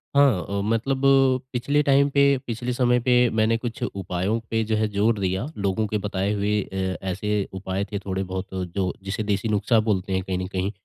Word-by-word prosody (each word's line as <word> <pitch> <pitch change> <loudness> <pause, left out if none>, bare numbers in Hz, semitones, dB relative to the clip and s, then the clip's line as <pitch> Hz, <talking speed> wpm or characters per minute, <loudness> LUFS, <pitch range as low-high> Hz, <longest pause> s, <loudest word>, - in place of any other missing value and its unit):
हाँ 135 - +4
अ, 100 0 -1
मतलब 115 +6 0 0.5
पिछले 140 +4 +1
टाइम 140 0 +4
पे, 140 -1 +4
पिछले 120 +2 -3
समय 125 -1 +3
पे 125 +1 0 0.2
मैंने 110 +1 +2
कुछ 115 -1 -6
उपायों 95 +3 -2
पे 115 0 +1
जो - - +3
है 110 0 +1
ज़ोर 105 +2 +2
दिया 95 +3 -1
लोगों 100 +2 0
के 105 - -1
बताए 100 0 -2
हुए 105 0 0
अ, 95 -1 -3
ऐसे 100 +2 -1
उपाय 95 +1 -3
थे 100 - -2
थोड़े 95 -1 -3
बहुत 95 0 -5 0.2
जो 95 0 -1
जिसे 100 +2 -3
देसी 105 +2 -1
नुस्ख़ा 110 +2 +2
बोलते 100 -3 0
हैं 95 - +1
कहीं 95 -1 -2
न 90 0 -3
कहीं 95 +1 -2
105 Hz, 200 wpm, -24 LUFS, 95-115 Hz, 0.5 s, हाँ